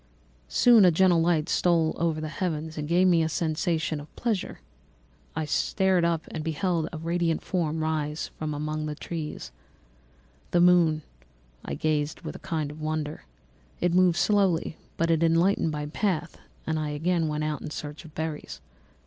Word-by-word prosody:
"Soon 235 - +6
a 180 - +8
gentle 175 0 +4
light 165 -2 +2
stole 165 -3 +2
over 165 -2 0
the 155 - -4
heavens 160 -1 -3
and 150 -1 -4
gave 175 +3 +3
me 175 -3 +4
a 160 - +1
sensation 160 -1 -1
of 145 - -13
pleasure. 220 -6 -2 0.8
I 160 0 -1
started 185 +2 +2
up 165 -2 0
and 155 - -4
beheld 165 +1 -1
a 165 - -6
radiant 165 0 -1
form 160 -4 -1
rise 155 -1 -2
from 155 -1 -3
among 155 +1 -3
the 150 - -4
trees. 150 - -6 1.0
[The 175 - +2
moon] 170 -3 +4 0.6
I 70 - -4
gazed 150 - -1
with - - -6
a - - -8
kind 155 -5 -3
of 155 +1 -11
wonder. 155 0 -3 0.5
It 175 -1 +1
moved 180 -1 +4
slowly, 190 -6 +2 0.2
but 165 0 +1
it 165 -1 +2
enlightened 165 +2 +3
my 150 -1 -3
path, 170 +1 -2 0.3
and 160 0 -1
I 155 -1 -2
again 165 +3 0
went 150 0 -2
out 155 -1 -2
in - - -5
search 150 0 -7
of 160 -1 -14
berries. 160 -1 -5
160 Hz, 170 wpm, -27 LUFS, 155-175 Hz, 1.0 s, a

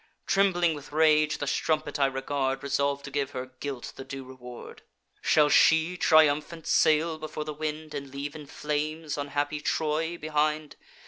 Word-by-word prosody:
Trembling 175 -4 +3
with 145 -1 -9
rage, 155 0 +3
the 145 - -3
strumpet 155 +1 -1
I 140 - +4
regard, 135 0 -2
Resolv'd 140 0 0
to 140 - -8
give 140 -1 -1
her 130 0 -5
guilt 140 -4 -5
the - - -6
due 135 0 -7
reward: 125 -2 -11 0.4
'Shall 150 -1 +4
she 160 +4 +5
triumphant 155 0 +3
sail 160 0 +3
before 155 0 -5
the 150 - -4
wind, 155 0 -5
And 140 -1 -5
leave 140 +2 -5
in 150 -2 -9
flames 150 +2 -3
unhappy 145 +1 -2
Troy 160 +3 -1
behind? 155 -1 -1
150 Hz, 155 wpm, -27 LUFS, 140-155 Hz, 0.4 s, she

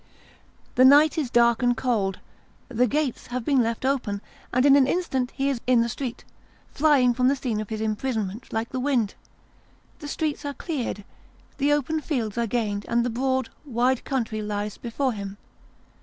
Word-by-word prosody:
The 255 - +4
night 290 +4 +7
is 280 -5 -2
dark 235 0 +4
and 245 -1 +2
cold, 220 -6 0 0.5
the 250 0 +2
gates 290 0 -1
have 250 -1 -4
been 275 -4 +3
left 230 +2 -2
open, 250 -7 0 0.3
and 255 +2 +2
in 280 -1 +7
an 275 -2 +5
instant 265 -7 0
he 270 +1 -2
is 270 -4 -1
in 250 -2 +5
the 235 - 0
street, 245 0 -5 0.5
flying 275 -5 +4
from 250 +1 +2
the 275 - +3
scene 240 -6 -2
of 215 - -6
this 220 +1 -4
imprisonment 220 -1 -3
like 225 +1 -2
the 255 - -3
wind. 250 -6 +1 0.9
The 295 - -7
streets 305 0 -2
are 285 -1 -4
cleared, 255 - -4 0.6
the 285 +1 +2
open 295 +2 +1
fields 235 -10 -2
are 235 - +1
gained 205 -3 -2
and 235 0 +2
the 245 - -1
broad 260 +1 0
wide 255 -2 +1
country 230 -5 -2
lies 210 0 -3
before 250 +2 -1
him. 200 -1 -6
250 Hz, 180 wpm, -25 LUFS, 225-275 Hz, 0.9 s, night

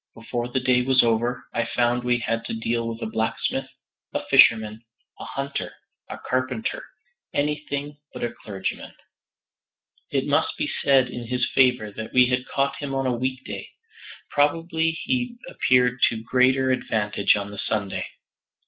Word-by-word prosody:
Before 120 +1 -3
the 125 +2 -1
day 125 -1 +3
was 130 +1 +4
over, 120 +1 0
I 115 - +1
found 120 +1 +1
we 125 0 +2
had 115 -1 -2
to - - -4
deal 115 +1 -1
with 115 0 -5
a - - -1
blacksmith, 110 +1 -1 0.5
a - - -2
fisherman, 110 0 +5 0.4
a - - -7
hunter, 140 0 -4 0.4
a - - -6
carpenter, 130 -2 -1 0.5
anything 145 0 -2
but - - -7
a 120 0 -2
clergyman. 95 -3 -5 1.1
It - - 0
must - - +1
be - - -1 0.2
said 135 -2 +5
in 120 -1 -7
his 125 +1 0
favor 125 -5 +3
that 110 +2 -7
we 125 0 +6
had 125 0 0
caught 140 0 0
him 140 -2 -4
on 135 0 0
a 130 - +2
weekday; 130 +2 -4 0.6
probably 160 +2 +1
he 245 -2 -1
appeared 125 -1 +2
to 110 -1 -5
greater 130 +2 +3
advantage 105 -5 +1
on 100 0 -4
the 100 - -8
Sunday. 100 0 -2
125 Hz, 155 wpm, -24 LUFS, 115-135 Hz, 1.1 s, we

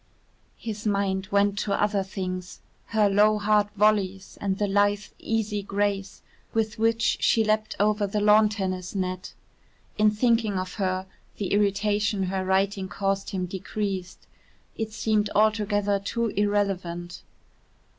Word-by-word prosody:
His 215 -1 -5
mind 195 -2 0
went 200 0 +2
to 200 -2 -1
other 205 -1 +2
things, 185 -1 -5 0.3
her 215 -2 +2
low 210 +2 +4
hard 210 0 +2
volleys 195 -2 +1
and 195 -1 -1
the 205 - +1
lithe, 205 +1 +2
easy 215 -2 -1
grace 200 -1 -2 0.3
with 220 -1 0
which 230 +1 +2
she 225 - +4
leapt 215 0 0
over 210 0 +2
the 210 +2 -1
lawn 210 +1 +5
tennis 185 -3 -4
net. 185 0 -3 0.6
In 215 0 +6
thinking 220 -2 +1
of 185 0 -4
her, 185 0 0 0.3
the 200 -2 -2
irritation 205 0 +1
her 190 0 -1
writing 190 +1 +1
caused 195 0 -1
him 185 -3 -2
decreased. 190 0 -4 0.5
It 220 -1 -3
seemed 215 -1 0
altogether 205 -1 +2
too 230 +3 -2
irrelevant. 195 -4 -1
205 Hz, 135 wpm, -26 LUFS, 190-210 Hz, 0.6 s, In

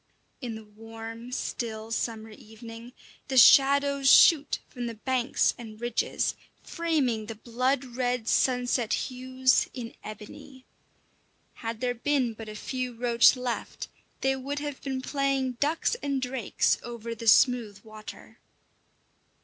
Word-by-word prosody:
In 240 -4 -5
the 220 0 -10
warm, 225 +2 -10
still, 225 -3 -4
summer 225 -1 -3
evening, 230 +3 -12 0.3
the 265 - -1
shadows 280 +1 +6
shoot 300 -4 +6
from 245 -2 -6
the 230 - -6
banks 255 +2 +1
and 220 -2 -10
ridges, 240 -1 -1 0.3
framing 280 - -1
the 225 - -6
blood 255 +5 -1
red 245 -2 -2
sunset 245 -2 +1
hues 255 0 +1
in 235 -2 -6
ebony. 215 +5 -11 0.9
Had 225 -1 -6
there 250 -1 0
been 250 -1 0
but 220 0 -9
a 215 - -8
few 250 +2 -4
roach 235 +1 +4
left, 250 -2 -5 0.3
they 270 0 +2
would 275 +2 -5
have 290 -2 -5
been 265 -2 -4
playing 275 -2 0
ducks 310 +3 +1
and 280 -1 -1
drakes 250 -4 0
over 235 -1 -6
the 230 0 -8
smooth 220 -4 +4
water. 215 -1 -12
245 Hz, 130 wpm, -27 LUFS, 225-265 Hz, 0.9 s, shadows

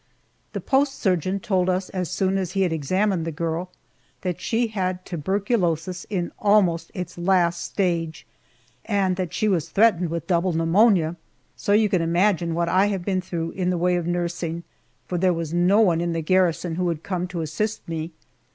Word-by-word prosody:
The - - -3
post 275 0 +2
surgeon 185 0 0
told 185 -5 +1
us 185 +1 -1
as 180 -4 -3
soon 190 +3 0
as 185 -2 -3
he 195 - +2
had 175 -3 0
examined 185 +4 0
the 165 - -3
girl 165 +3 -3 0.5
that 180 -3 -3
she 235 +1 +1
had 185 -3 -2
tuberculosis 180 0 -1
in 180 -4 -2
almost 200 -5 +3
its 180 -1 -6
last 175 -1 +2
stage, 170 -4 -2 0.6
and 195 -4 +1
that 180 -3 -2
she 215 - 0
was 180 -7 0
threatened 195 -5 +3
with 170 +1 -3
double 175 -1 +1
pneumonia! 170 0 +3 0.4
So 205 - 0
you 215 +1 +5
can 185 -4 +1
imagine 170 0 +1
what 170 0 0
I 190 +3 +3
have 195 -4 -3
been 190 -2 0
through 170 -3 -4
in 180 -2 -1
the 180 - 0
way 180 +1 +2
of 175 -1 -2
nursing, 170 -1 -2 0.4
for 180 - -2
there 185 0 +3
was 165 -1 -4
no 180 +5 +4
one 170 -6 +3
in 170 -1 -1
the 165 - -1
garrison 175 -1 +1
who 180 - 0
would 165 -3 -2
come 180 -2 -2
to 175 -2 -4
assist 190 +8 -3
me. 165 0 -4
180 Hz, 190 wpm, -24 LUFS, 170-195 Hz, 0.6 s, you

